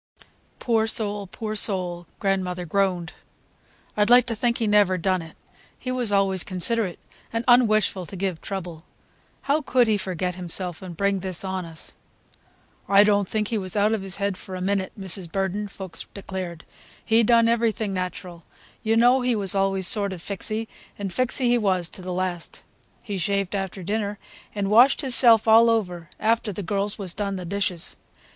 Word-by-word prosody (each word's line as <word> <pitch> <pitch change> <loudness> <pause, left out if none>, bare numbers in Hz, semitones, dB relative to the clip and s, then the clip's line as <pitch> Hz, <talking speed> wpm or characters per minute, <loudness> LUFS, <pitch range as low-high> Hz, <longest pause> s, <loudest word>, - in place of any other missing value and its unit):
"Poor 225 -2 +1
soul, 205 -3 +1
poor 215 +3 -5
soul!" 180 -5 +1
grandmother 185 -3 -1
groaned. 180 -1 -1 0.8
"I'd 210 +1 +2
like 245 0 +7
to 235 -2 -3
think 235 +2 0
he 230 - -1
never 205 -3 +3
done 185 +1 0
it. 160 -1 -12 0.4
He 255 - -5
was 245 -4 -1
always 195 -2 +1
considerate 185 +1 -2 0.3
and 230 +1 -2
un 245 -1 +6
wishful 200 -4 0
to - - -9
give 185 -3 -3
trouble. 175 -5 -6 0.6
How 285 +3 +1
could 250 -4 +2
he 215 -1 +2
forget 185 -2 -3
himself 180 -1 -3
and 180 -3 -9
bring 200 0 +1
this 185 -1 -5
on 190 -1 -3
us!" 165 -1 -11 1.0
"I 200 +1 +7
don't 205 -2 +2
think 215 -1 -1
he 225 - -1
was 185 0 -5
out 210 +1 +3
of 220 - -1
his 190 -1 -1
head 200 -1 -2
for 185 0 -9
a - - -5
minute, 190 0 -1
Mrs. 190 -3 +1
Burden," 195 +2 -2
Fuchs 190 -3 -7
declared. 185 -4 -6 0.4
"He 225 0 +4
done 230 0 +4
everything 225 -3 0
natural. 180 -1 -5 0.4
You 225 +1 +1
know 245 +3 +5
he 250 -1 +1
was 195 -3 0
always 195 -1 0
sort 200 -1 +1
of 180 - -8
fixy, 215 +3 -2 0.3
and 200 -2 -4
fixy 255 +1 +1
he 240 0 +3
was 185 -5 0
to - - -6
the 185 0 -6
last. 180 -2 -4 0.4
He 205 -3 -4
shaved 200 0 -1
after 195 -1 -4
dinner, 205 +2 -2 0.4
and 200 -1 -1
washed 245 +8 +6
hisself 240 -5 +5
all 225 +1 +7
over 180 -8 -1
after 225 -1 +1
the 200 +1 -6
girls 200 +2 -2
was 190 -5 -5
done 200 -1 -3
the 180 -1 -6
dishes. 185 -2 -2
200 Hz, 180 wpm, -24 LUFS, 185-220 Hz, 1.0 s, like